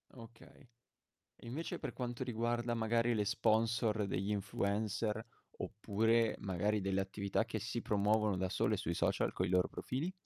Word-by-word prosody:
Okay. 115 +3 -14 0.7
E - - -12
invece 145 +8 -4
per - - -4
quanto 120 -1 -4
riguarda, 120 0 0
magari, 115 +1 +2
le 105 -1 +1
sponsor 110 0 +2
degli 100 +2 -1
influencer, 105 +2 -1 0.4
oppure, 110 +1 +1
magari, 100 +2 0
delle 95 0 0
attività 100 +2 -1
che 115 -1 -3
si 115 +2 -3
promuovono 105 0 +2
da 95 0 0
sole - - +1
sui 85 - -2
social - - +1
coi - - -1
loro 90 0 +3
profili? 150 +9 -3
110 Hz, 145 wpm, -36 LUFS, 100-115 Hz, 0.7 s, loro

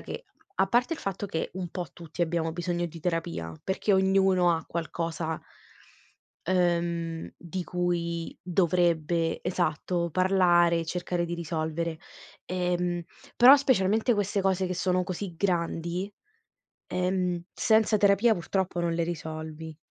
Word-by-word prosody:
che, 480 - -7 0.3
a 190 - +4
parte 245 +9 +2
il - - -3
fatto 195 +1 -3
che 165 -4 -3
un 185 -2 -4
po' 180 -3 -4
tutti 170 0 -5
abbiamo 165 -1 0
bisogno 175 0 -2
di 165 0 -10
terapia, 165 - -2
perché 190 +2 0
ognuno 190 -2 +4
ha 160 - -4
qualcosa 165 -1 -3 1.1
ehm, 170 -2 0
di 175 +2 -5
cui 170 -2 -2
dovrebbe, 170 -2 +1
esatto, 175 0 -1
parlare 175 -2 +4
e 165 - -2
cercare 175 +1 -2
di 170 0 -3
risolvere, 160 0 -3 0.5
ehm, 180 -1 -1 0.3
però 260 +4 +9
specialmente 225 -3 +2
queste 205 -1 0
cose 190 -1 +1
che 185 - -2
sono 185 0 +1
così 180 0 -5
grandi, 175 +1 -1 0.8
ehm, 180 -1 -1
senza 220 -1 +3
terapia 205 +3 +4
purtroppo 180 0 -2
non 170 -1 0
le 170 - +1
risolvi. 160 -1 -6
175 Hz, 130 wpm, -28 LUFS, 170-190 Hz, 1.1 s, però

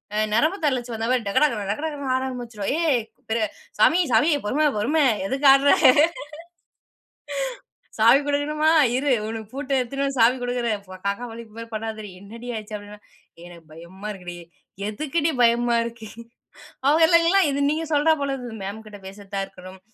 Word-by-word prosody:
அ - - -1 0.2
நரம்பு 315 - +2
தளர்ச்சி 245 -3 -2
வந்தா 225 +1 -3
மாரி 245 -4 0
டக, 200 - -2
டக, 230 -8 -1
டக, 210 - -3
டகன்னு 285 -4 -3
ஆட - - -2
ஆரம்பிச்சுடும். 240 -5 -5
"ஏய்! 285 -8 +2 0.4
அ 205 - -6 0.3
சாமி, 325 +11 +5
சாமி 270 +9 +4 0.2
பொறும 300 +6 +2
பொறும. 295 +9 +2 0.2
எதுக்கு 275 +5 +1
ஆட்ற?" 275 +1 +4 2.3
"சாவி 235 +5 +6
குடுக்கணுமா? 300 +2 +1 0.3
இரு. 275 +1 0 0.2
உனக்கு 220 -1 -6
பூட்ட 275 0 -6
எடுத்துன்னு 275 +3 -3
வந்து 275 -2 -3
சாவி 235 +3 +5
குடுக்குறேன். 240 -4 -2 0.3
காக்கா 200 +4 -2
வலிப்பு 225 -1 -11
மாரி 230 0 -8
பண்ணாதடி. 215 -1 -5
என்னடி 230 +4 -11
ஆச்சு?" 215 0 -9
அப்டின்னா, 205 0 -12 0.5
"எனக்கு 170 -2 -14
பயமா 175 +5 -10
இருக்குடி. 180 -2 -9 0.5
எதுக்குடி 305 +8 -1
பயமா 235 0 +3
இருக்கு?" 235 -1 -8 0.8
அவங்களலாம் 335 +4 +5
இது 280 - -2
நீங்க 315 +2 -1
சொல்றா 300 +1 +3
போல 280 -1 -1
இருக்குது 245 -4 -7
மேம்கிட்ட 210 +1 -8
பேசிட்டு 195 +1 -11
தான் 195 0 -1
இருக்கணும். 185 0 -13
240 Hz, 155 wpm, -23 LUFS, 210-285 Hz, 2.3 s, சாவி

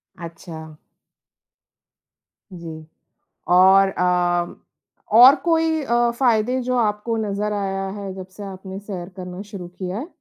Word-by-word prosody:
अच्छा। 165 -1 -9 1.9
जी। 160 -2 -9 0.6
और 190 +2 +6
अ, 175 -1 0 0.6
और 255 +3 +10
कोई 325 -2 +1
अ, 240 -2 +2
फ़ायदे 250 0 +2
जो 250 +1 -1
आपको 220 0 0
नज़र 210 -1 -2
आया 195 -1 -2
है 200 -1 -6
जब 185 -1 -8
से 205 - -8
आपने 190 0 -8
सैर 190 -4 -7
करना 180 +1 -7
शुरू 185 -4 -7
किया 180 +2 -6
है? 270 - -5
195 Hz, 125 wpm, -21 LUFS, 180-230 Hz, 1.9 s, और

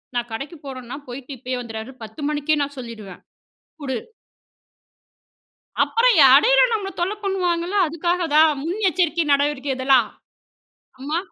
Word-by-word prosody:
நான் 240 0 -2
கடைக்கு 285 +8 -6
போறேன்னா 255 -1 -7
போயிட்டு 250 +2 -9
இப்பயே 255 +1 -4
வந்துடுறேன்" 230 +2 -8
10 290 +7 -10
மணிக்கே 300 0 0
நான் 285 -1 -7
சொல்லிருவேன். 220 -6 -9 0.6
"குடு!" 265 -3 -3 1.9
அப்புறம் 480 -1 +3 0.2
இடையில - - +4
நம்மள 400 -3 -2
தொல்ல 370 +4 0
பண்ணுவாங்கல்ல. 360 -1 -1
அதுக்காக 345 +3 -1
தான் 315 +1 +7
முன்னெச்சரிக்கை 350 -2 0
நடவடிக்கை 285 -1 0
இதெல்லாம். 260 -3 +3 0.9
"அம்மா, 295 +5 -2
290 Hz, 115 wpm, -21 LUFS, 255-345 Hz, 1.9 s, தான்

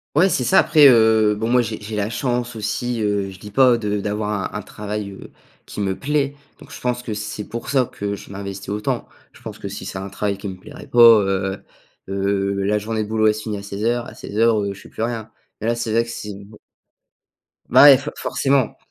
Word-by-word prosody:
Ouais, 175 +6 +5
c'est 130 - 0
ça. 120 - +4
Après, 150 -2 +6
heu, 110 -3 +5
bon, 110 +2 -3
moi, 125 +1 +4
j'ai 110 -2 -5
j'ai 105 +1 -6
la 105 +1 -1
chance 120 0 -2
aussi, 115 +2 -2
heu, 100 -2 0
je 95 - -12
dis 105 - -9
pas 125 +2 +4
de 105 -2 -2
d'avoir 105 0 -3
un 105 - -3
travail, 105 0 -6
heu, 95 - -12 0.3
qui - - -8
me 95 -1 -1
plaît, 145 -1 0 0.3
donc - - -15
je - - -9
pense 125 0 -1
que 115 -3 -4
c'est 105 0 -5
pour 115 +2 -6
ça 130 -2 +2
que 100 0 -4
je 100 - -11
m'investis 100 -1 -7
autant. 105 +1 -2 0.2
Je - - -18
pense - - -9
que - - -6
si - - -7
c'est - - -6
un 95 +1 -5
travail 100 +1 -2
qui 100 +1 -7
me 95 - -6
plairait - - -11
pas, 120 - -3 0.2
heu 95 0 -2 0.5
heu, 100 0 -1
la 105 +2 +1
journée 110 +1 -2
de - - -9
boulot, 110 0 +1
elle 105 - +3
se 110 - -6
finit 110 -2 -3
à 100 - -7
16:00. 110 +4 -2
A - - -9
16:00, 110 +1 +1
heu, 100 -1 -3
je 95 - -13
fais - - -15
plus - - -6
rien, 115 -1 -3 0.3
et - - -2
là, 115 - +2
c'est 115 -1 -3
vrai 115 +1 +3
que 115 - -9
c'est 105 -3 -6 1.3
Bah, - - +7
ouais, 140 -2 +10
for 150 +2 -6
forcément. 135 -3 0
105 Hz, 235 wpm, -21 LUFS, 100-120 Hz, 1.3 s, ouais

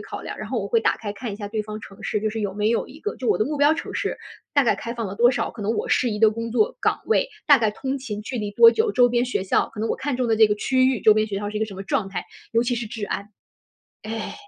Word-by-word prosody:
考 - - -7
量， - - -7
然 - - -6
后 - - -1
我 - - -5
会 465 - +3
打 - - +2
开 205 -2 -5
看 220 +1 -6
一 - - -4
下 205 0 -6
对 215 +1 -2
方 215 0 -6
城 195 -1 -13
市， 210 - -1
就 215 0 -1
是 225 - -5
有 200 -3 -2
没 210 +1 +1
有 230 - 0
一 305 - -14
个 425 - -4
就 250 - -3
我 - - +4
的 215 - +1
目 295 +3 -3
标 290 +2 +4
城 - - -6
市 - - -2 0.4
大 285 - +4
概 235 - +2
开 235 - -5
放 230 -4 -3
了 195 - -7
多 240 +2 +5
少， 245 - 0
可 235 - -11
能 210 +3 0
我 - - -2
适 250 - +2
宜 210 -2 -3
的 220 -1 +6
工 230 +1 -5
作 430 - +1
岗 - - +1
位 - - +2 0.2
大 285 -2 +8
概 220 -3 +1
通 270 +5 -3
勤 215 -6 -6
距 245 +3 -5
离 205 -1 -3
多 460 - +8
久， 445 -2 +1
周 245 -1 +5
边 240 0 +1
学 250 -6 -2
校 190 - +1
可 210 - -6
能 225 - -1
我 - - -1
看 285 -2 -2
中 250 -1 0
的 225 - +2
这 220 0 +7
个 210 - +1
区 255 +5 +2
域， 260 -4 +1
周 215 - +7
边 215 0 +2
学 205 -2 -4
校 205 +1 -3
是 210 - -5
一 - - 0
个 220 - 0
什 200 - -9
么 195 - -6
状 195 0 -1
态， 185 -2 -5 0.3
尤 230 +1 +3
其 245 0 -1
是 235 -1 -3
治 215 0 -5
安， 200 +2 -4 0.7
哎。 220 0 -5
225 Hz, 350 characters per minute, -23 LUFS, 210-255 Hz, 0.7 s, 大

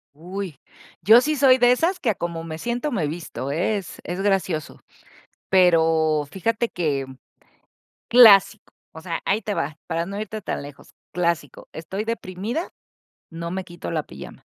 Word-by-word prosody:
¡Uy! 180 -2 -7 0.4
Yo 225 +5 +7
sí 305 +3 0
soy 260 -2 +5
de 245 0 +5
esas 335 +9 +1
que 225 - +1
a - - -5
como 170 -1 -4
me 160 -1 -7
siento 240 - -2
me 185 - -1
visto, 155 -4 -6
eh, 175 +8 0
es 190 -4 -8
es 180 +2 -4
gracioso. 190 -6 -1 0.7
Pero, 160 -4 +3
fíjate 230 +5 -1
que 145 -8 -2 1.0
clásico. 220 -3 +6 0.2
O 160 - -10
sea, 165 -1 -4
ahí 205 +3 +1
te 205 +1 -2
va, 150 -2 -3
para 165 0 -2
no 200 +1 -5
irte 215 0 -5
tan 170 - -4
lejos. 145 -1 -12 0.2
Clásico, 170 -5 -2
estoy 190 +6 -5
deprimida, 225 - -4 0.6
no 170 0 -6
me 190 +1 -4
quito 175 -1 -8
la 155 -3 -2
pijama. - - -11
185 Hz, 160 wpm, -23 LUFS, 165-220 Hz, 1.0 s, Yo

